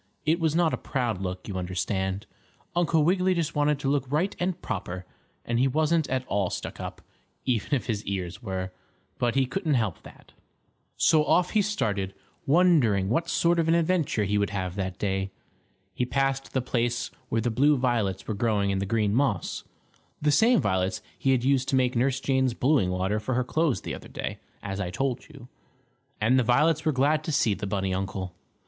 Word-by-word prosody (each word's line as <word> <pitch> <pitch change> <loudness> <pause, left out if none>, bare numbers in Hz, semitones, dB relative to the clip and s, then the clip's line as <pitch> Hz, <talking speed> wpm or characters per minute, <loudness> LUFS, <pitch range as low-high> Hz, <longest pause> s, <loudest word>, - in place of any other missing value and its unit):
It 160 +3 +2
was 160 -2 +1
not 170 -2 +3
a - - 0
proud 120 -8 -2
look, 90 -1 -4
you 100 -3 -4
understand. 95 +2 -2 0.5
Uncle 165 -3 +3
Wiggily 185 +2 +2
just 170 -3 -1
wanted 145 0 +2
to 140 - -4
look 140 -2 0
right 170 +7 +1
and 180 0 -1
proper, 90 +1 -5 0.4
and 120 0 0
he 130 - +4
wasn't 155 +3 +1
at 130 0 -1
all 100 -5 0
stuck - - -5
up, - - -7 0.4
even 125 +2 +1
if 130 - -2
his 110 -3 -2
ears 95 0 -4
were, 95 -4 -4 0.5
but 120 0 +1
he 135 -1 +3
couldn't 155 +2 -1
help 110 -8 -1
that. - - -15 0.7
So 155 -2 +4
off 180 +3 +2
he 215 - +3
started, 100 - -1 0.3
wondering 135 - +4
what 165 +9 0
sort 170 0 +2
of 165 - +1
an 165 - +4
adventure 165 -9 +1
he 105 +1 +1
would 100 -2 +1
have 95 -3 -3
that 95 -1 -3
day. 95 -1 -1 0.6
He 125 - -1
passed 135 +1 0
the 130 - 0
place 120 -1 -1 0.2
where 115 - +1
the 120 +1 0
blue 145 +6 +4
violets 115 -7 0
were 110 - -1
growing 100 -2 +1
in 95 - 0
the 100 - -2
green 105 -1 +1
moss 115 -7 0 0.5
the 150 0 +2
same 225 - +5
violets 95 -1 0
he 135 - -1
had 130 -2 +3
used 135 -1 +2
to - - +2
make 125 0 +2
Nurse 130 +2 +1
Jane's 130 -3 +1
blueing 130 -8 +2
water 95 +3 0
for 120 +4 -2
her 125 - +2
clothes 155 +1 0
the - - -5
other - - -9
day, - - -5 0.2
as 100 0 -4
I 90 -3 -2
told 130 +7 -2
you. 140 -5 -13 0.7
And 120 +5 +4
the - - +3
violets 150 +6 +3
were 155 - +3
glad 145 +3 +2
to - - -2
see 115 -7 +2
the 100 +1 -4
bunny 95 -1 -1
uncle. 95 -1 -3
125 Hz, 200 wpm, -27 LUFS, 100-150 Hz, 0.7 s, same